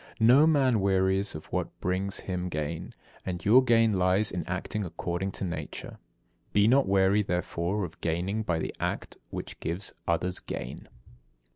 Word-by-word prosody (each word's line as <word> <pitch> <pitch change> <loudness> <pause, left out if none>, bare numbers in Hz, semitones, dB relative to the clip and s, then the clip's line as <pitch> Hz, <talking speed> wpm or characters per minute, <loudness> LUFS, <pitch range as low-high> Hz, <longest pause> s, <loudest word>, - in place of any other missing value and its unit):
74. 110 - +4
No 150 +3 +6
man 135 -7 +3
wearies 95 0 +1
of 75 - -7
what - - -2
brings 95 +2 -1
him 90 -1 -3
gain, 75 0 -4 0.3
and 90 -1 -5
your 125 +6 +7
gain 115 -5 +3
lies 95 +4 +2
in 90 - -3
acting 95 +4 -3
according 90 +2 -3
to - - -5
nature. 80 -5 -5 0.5
Be 105 +1 +5
not 135 +3 +4
weary, 95 +1 +4
therefore, 90 +1 -1
of 85 0 -12
gaining 90 +6 -1
by 85 -6 0
the 80 - -3
act - - -3
which - - -6
gives 85 +5 -2
others 90 +2 0
gain. - - -7
95 Hz, 160 wpm, -28 LUFS, 90-105 Hz, 0.5 s, your